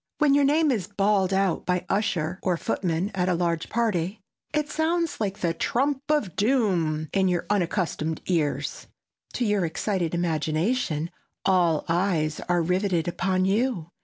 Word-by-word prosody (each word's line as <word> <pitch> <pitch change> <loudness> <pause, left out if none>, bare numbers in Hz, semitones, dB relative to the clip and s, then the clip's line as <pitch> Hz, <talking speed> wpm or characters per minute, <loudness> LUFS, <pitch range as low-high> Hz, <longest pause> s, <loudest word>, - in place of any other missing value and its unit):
When 300 -3 +4
your 285 0 +4
name 300 +1 +3
is 205 -8 -1
bawled 200 -2 +1
out 195 -2 +1
by 180 -1 0
usher 185 -4 -1
or 180 -3 0
footman 180 -1 -1
at 185 -1 0
a 180 - +2
large 170 -1 -1
party, 210 -4 0 0.3
it 300 -1 0
sounds 325 -1 -1
like 200 -1 -2
the 170 -2 +1
trump 270 - 0
of 295 - +1
doom 185 - +1
in 190 -1 +3
your 180 -1 0
unaccustomed 170 -4 -1
ears. 160 -5 -1 0.5
To 245 - -1
your 205 -3 +1
excited 175 0 -1
imagination 165 - 0 0.3
all 175 -5 +3
eyes 165 -3 0
are 175 -1 +3
riveted 180 -1 0
upon 185 +1 0
you. 200 -4 0
185 Hz, 150 wpm, -25 LUFS, 170-215 Hz, 0.5 s, When